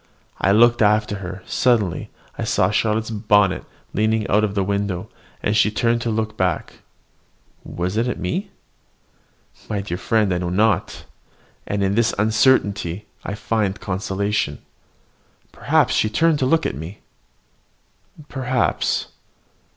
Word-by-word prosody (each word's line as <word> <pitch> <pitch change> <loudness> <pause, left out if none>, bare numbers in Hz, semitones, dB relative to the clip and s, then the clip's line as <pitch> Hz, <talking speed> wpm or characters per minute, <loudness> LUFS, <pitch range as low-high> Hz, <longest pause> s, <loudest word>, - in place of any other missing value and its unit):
I 100 - +3
looked 120 +3 +5
after 105 -1 +2
her: 95 -1 -7
suddenly 110 -8 +1 0.3
I - - -4
saw - - +2
Charlotte's 110 +1 0
bonnet 105 -3 +2 0.3
leaning 110 0 +1
out 105 +1 +3
of 105 -1 -1
the 100 - +1
window, 100 -2 -2 0.3
and 105 - +1
she 105 - +4
turned 115 +2 +1
to 115 - -2
look 110 0 -2
back, 90 -5 -2 0.8
was 90 +4 -3
it 115 +2 +1
at 125 - -2
me? 190 - -3 1.2
My 105 - -1
dear 90 -3 -5
friend, 105 -4 +1
I 90 - -1
know 90 -1 -2
not; 100 +1 0 0.6
and 100 0 -1
in 95 0 +1
this 115 +2 +2
uncertainty 105 -4 +2 0.2
I 100 - -4
find 105 -2 -1
consolation. 95 -4 -2 0.9
Perhaps - - +2
she 110 - +2
turned 160 +6 +2
to 130 - +1
look 165 +4 +2
at - - -1
me. 80 +9 -8 1.3
Perhaps! 130 -2 0
105 Hz, 135 wpm, -21 LUFS, 95-110 Hz, 1.3 s, looked